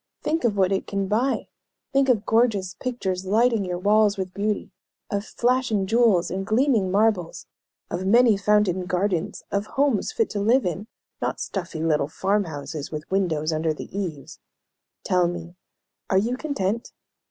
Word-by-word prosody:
Think 320 +2 0
of 210 -4 +1
what 190 -1 +3
it 195 - -1
can 195 -1 -2
buy. 235 +7 0 0.5
Think 275 0 +3
of 225 -4 +2
gorgeous 220 -5 +2
pictures 190 -6 -3
lighting 225 +2 +2
your 180 -1 -3
walls 205 +2 +3
with 185 -1 -4
beauty, 205 +1 -2 0.4
of 200 0 -1
flashing 240 -3 0
jewels 220 -5 +3
and 190 +1 -2
gleaming 220 -2 +2
marbles, 200 -3 +1 0.5
of 185 +2 -2
many 235 +1 +5
fountained 195 -3 +2
gardens, 180 -2 -1
of 200 +1 -1
homes 275 - +2
fit 450 0 0
to 205 - -2
live 235 +6 +3
in, 180 +4 -3 0.3
not - - -2
stuffy 170 -4 -4
little 155 -3 +1
farm 200 +6 0
houses, 145 -1 -6
with 155 +2 -7
windows 165 -5 0
under 155 0 0
the 175 - -9
eaves. 165 -9 -5 0.6
Tell 180 -1 +2
me, 175 -1 -6 0.6
are 190 - +3
you 230 +6 +1
content? 235 -7 -2
200 Hz, 160 wpm, -24 LUFS, 180-225 Hz, 0.6 s, many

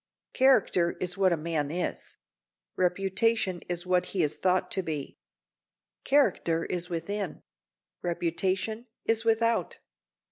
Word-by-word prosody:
Character 215 -10 +3
is 180 -1 -1
what 190 -2 +3
a 170 - +2
man 155 -2 -2
is; 175 +3 -4 0.6
reputation 190 +2 +1
is 175 0 -2
what 180 0 +2
he 185 -4 0
is 150 - 0
thought 185 0 +1
to 190 - +1
be. 155 -5 -5 0.8
Character 180 - +2
is 180 0 -3
within; 180 +2 -4 0.6
reputation 185 +7 -1 0.2
is 225 0 +2
without. 230 -4 +1
180 Hz, 115 wpm, -28 LUFS, 170-215 Hz, 0.8 s, Character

